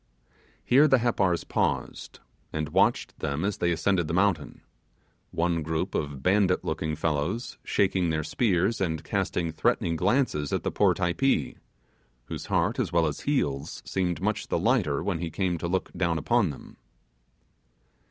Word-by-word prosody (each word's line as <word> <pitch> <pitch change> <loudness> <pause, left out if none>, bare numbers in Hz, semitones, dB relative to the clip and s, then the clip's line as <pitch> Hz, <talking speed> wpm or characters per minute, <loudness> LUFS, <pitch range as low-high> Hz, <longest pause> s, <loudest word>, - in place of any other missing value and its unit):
Here 140 +5 +6
the 135 -2 +5
Happars 100 -8 +1
paused - - -2 0.3
and 75 -1 -3
watched - - +1
them 70 +5 -2
as 100 -1 -1
they 85 - +1
ascended 85 0 +1
the 85 - -2
mountain, 90 -5 0 0.7
one 85 0 0
group 80 +1 -2
of 70 -2 -3
bandit 95 -1 +2
looking 80 -1 -2
fellows, 80 - -2
shaking 95 -3 +1
their 80 -1 -1
spears 95 +4 +1
and 80 -4 -1
casting 85 -2 -1
threatening 85 +1 0
glances 95 - +1
at - - -1
the - - -1
poor - - +3
Typee, 95 +10 0 0.7
whose - - -6
heart - - +1
as - - -1
well 85 -1 +3
as 75 - -2
heels 75 - -2
seemed 90 -2 -1
much 105 +2 -1
the - - 0
lighter 100 - +1
when 90 -5 -1
he 85 0 -3
came 90 0 -1
to 85 - -2
look 95 +2 -1
down 85 -2 0
upon 115 +3 +2
them. 70 - -10
85 Hz, 155 wpm, -27 LUFS, 80-100 Hz, 0.7 s, Here